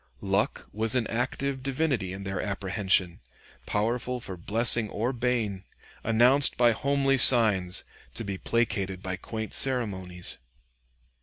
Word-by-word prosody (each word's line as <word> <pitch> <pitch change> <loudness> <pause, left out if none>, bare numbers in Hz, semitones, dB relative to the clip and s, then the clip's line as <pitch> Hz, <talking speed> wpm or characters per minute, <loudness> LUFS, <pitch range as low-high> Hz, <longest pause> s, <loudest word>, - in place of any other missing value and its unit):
Luck 100 +1 -1
was 110 +3 +1
an 125 -3 +1
active 130 +4 -3
divinity 135 - -1
in 95 +1 -7
their 95 -1 -3
apprehension, 95 -3 0 0.5
powerful 120 +4 -1
for 95 -5 -7
blessing 110 +4 +1
or 115 +6 -2
bane, 115 -6 -2 0.4
announced 125 +5 +5
by 120 -1 +5
homely 135 +2 +1
signs, 105 -8 +5 0.3
to - - -3
be 100 -3 -5
placated 100 -5 -1
by 95 0 -3
quaint 110 +3 -6
ceremonies. 95 -9 -1
110 Hz, 125 wpm, -27 LUFS, 95-125 Hz, 0.5 s, announced